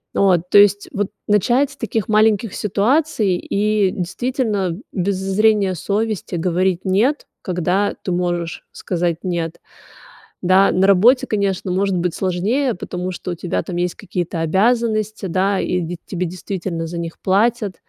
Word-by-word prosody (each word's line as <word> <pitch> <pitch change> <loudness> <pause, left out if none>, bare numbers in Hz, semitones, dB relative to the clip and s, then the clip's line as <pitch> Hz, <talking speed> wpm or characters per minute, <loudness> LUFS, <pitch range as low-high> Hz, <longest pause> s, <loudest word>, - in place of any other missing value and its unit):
Вот. 180 -3 +2
То - - +5
есть 205 0 +4
вот 205 -1 -1 0.2
начать 240 +7 +2
с - - -13
таких 225 -4 -2
маленьких 215 -1 +3
ситуаций 215 - +1
и 205 -1 +1
действительно 200 -2 -2
без 195 +1 0
зазрения 195 0 +2
совести 205 +1 -2
говорить 180 +1 0
нет, 220 +10 +1 0.2
когда 185 +2 0
ты 185 - -2
можешь 175 -1 -2
сказать 175 -2 -2
нет. 170 -2 -3 0.8
Да? 185 +2 +4
На 190 +2 +3
работе, 225 +7 +5
конечно, 195 -3 -1
может 195 +1 +1
быть 175 -1 -1
сложнее, 210 +9 0
потому 180 +1 -5
что 180 0 -6
у - - -3
тебя 170 +1 -2
там 180 - -6
есть 175 0 -1
какие-то 180 -6 -4
обязанности, 215 +3 +1
да, 190 +3 +1
и 180 - 0
д 175 +1 -5
тебе 180 -1 -3
действительно 175 -1 -4
за 170 +1 -5
них 165 -1 -6
платят. 210 +1 +1
190 Hz, 150 wpm, -19 LUFS, 180-215 Hz, 0.8 s, То